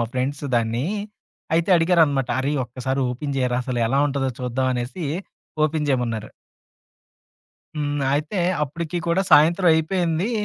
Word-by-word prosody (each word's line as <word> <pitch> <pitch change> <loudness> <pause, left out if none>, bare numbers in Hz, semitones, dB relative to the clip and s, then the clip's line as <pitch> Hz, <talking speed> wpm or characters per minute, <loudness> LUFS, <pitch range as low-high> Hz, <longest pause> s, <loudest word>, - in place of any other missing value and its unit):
మా 115 - 0
ఫ్రెండ్స్ 140 +3 -2
దాన్ని. 115 +4 0 0.7
అయితే 170 +3 +1
అడిగారనమాట. 165 -6 +3
"అరేయ్! 145 +2 -1
ఒక్కసారి 130 +3 -3
ఓపెన్ 140 +3 -4
జేయరా 125 -1 +1
అసలు 125 -2 -2
ఎలా 135 +4 +1
ఉంటదో 135 -2 -1
చూద్దాం" 125 +1 -1
అనేసి, 125 +8 -4 0.6
ఓపెన్ 155 -1 -1
జేయమన్నారు. 115 -5 -1 1.5
హ్మ్. 145 -1 -1
అయితే 155 +6 -1 0.2
అప్పటికి 165 +4 -4
కూడా 175 +3 +2
సాయంత్రం 170 +4 +6
అయిపోయింది, 170 +4 0
145 Hz, 125 wpm, -22 LUFS, 125-165 Hz, 1.5 s, సాయంత్రం